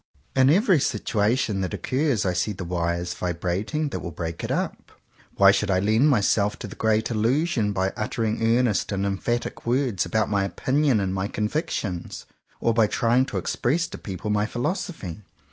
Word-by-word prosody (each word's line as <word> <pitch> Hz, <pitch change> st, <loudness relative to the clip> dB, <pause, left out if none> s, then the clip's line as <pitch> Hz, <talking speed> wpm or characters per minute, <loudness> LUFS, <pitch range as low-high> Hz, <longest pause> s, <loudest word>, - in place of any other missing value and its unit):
In 130 Hz, 0 st, +5 dB
every 190 Hz, -, +4 dB
situation 105 Hz, -3 st, 0 dB
that 95 Hz, -, -2 dB
occurs 130 Hz, -5 st, 0 dB
I 90 Hz, -, +1 dB
see 90 Hz, +4 st, -1 dB
the 95 Hz, -, -6 dB
wires 85 Hz, 0 st, -1 dB
vibrating 90 Hz, -, -2 dB
that -, -, -4 dB
will 90 Hz, -, -5 dB
break 85 Hz, 0 st, -5 dB
it -, -, -3 dB
up. -, -, -3 dB, 0.4 s
Why -, -, +7 dB
should -, -, 0 dB
I 95 Hz, -1 st, +3 dB
lend 110 Hz, +9 st, +3 dB
myself 105 Hz, -4 st, +2 dB
to -, -, -7 dB
the 100 Hz, -, -10 dB
great 110 Hz, +1 st, +1 dB
Illusion 115 Hz, 0 st, +1 dB
by 95 Hz, -1 st, 0 dB
uttering 110 Hz, 0 st, -2 dB, 0.2 s
earnest 120 Hz, -6 st, +1 dB
and 100 Hz, 0 st, -1 dB
emphatic 110 Hz, +5 st, -2 dB
words 120 Hz, -5 st, +1 dB
about 110 Hz, -2 st, 0 dB
my 100 Hz, -2 st, +1 dB
opinions 130 Hz, -, +1 dB
and 95 Hz, -1 st, -1 dB
my 95 Hz, +1 st, -1 dB
convictions, 105 Hz, -, -3 dB, 0.3 s
or 115 Hz, -, +2 dB
by 110 Hz, -1 st, +4 dB
trying 120 Hz, +4 st, +2 dB
to -, -, -4 dB
express 160 Hz, +8 st, 0 dB
to -, -, -8 dB
people 95 Hz, +1 st, -5 dB
my 105 Hz, 0 st, +1 dB
philos 180 Hz, -, -2 dB
ophy? 100 Hz, -, -7 dB
105 Hz, 180 wpm, -24 LUFS, 95-125 Hz, 0.4 s, Why